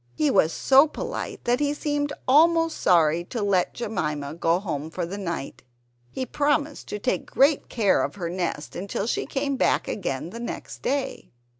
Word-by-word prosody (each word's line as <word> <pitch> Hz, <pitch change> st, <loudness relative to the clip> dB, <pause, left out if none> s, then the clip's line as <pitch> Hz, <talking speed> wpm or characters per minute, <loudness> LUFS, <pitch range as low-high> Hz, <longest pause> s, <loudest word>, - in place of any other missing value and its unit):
He 150 Hz, +4 st, +2 dB
was 160 Hz, -, +4 dB
so 270 Hz, -, +5 dB
polite -, -, -5 dB
that 245 Hz, +2 st, +1 dB
he 290 Hz, 0 st, 0 dB
seemed 290 Hz, -1 st, -1 dB, 0.2 s
almost 330 Hz, +4 st, +4 dB
sorry 170 Hz, -2 st, +3 dB
to 230 Hz, +2 st, -4 dB
let 195 Hz, -3 st, +1 dB
Jemima 150 Hz, -10 st, -3 dB
go 170 Hz, +1 st, +1 dB
home 160 Hz, -6 st, -4 dB
for 175 Hz, +1 st, -3 dB
the 195 Hz, +4 st, -6 dB
night. 170 Hz, -7 st, -5 dB, 0.5 s
He 260 Hz, -, -4 dB
promised 290 Hz, +1 st, 0 dB
to -, -, -4 dB
take 230 Hz, +5 st, -2 dB
great 280 Hz, +2 st, +3 dB
care 210 Hz, -5 st, +2 dB
of -, -, -2 dB
her 180 Hz, -4 st, -4 dB
nest 170 Hz, -4 st, -3 dB
until 200 Hz, +2 st, -3 dB
she 235 Hz, -, -1 dB
came 275 Hz, -1 st, -1 dB
back -, -, +2 dB
again 165 Hz, -4 st, -3 dB
the 230 Hz, -, -7 dB
next 235 Hz, -, -6 dB
day. 275 Hz, 0 st, -2 dB
205 Hz, 175 wpm, -25 LUFS, 170-280 Hz, 0.5 s, so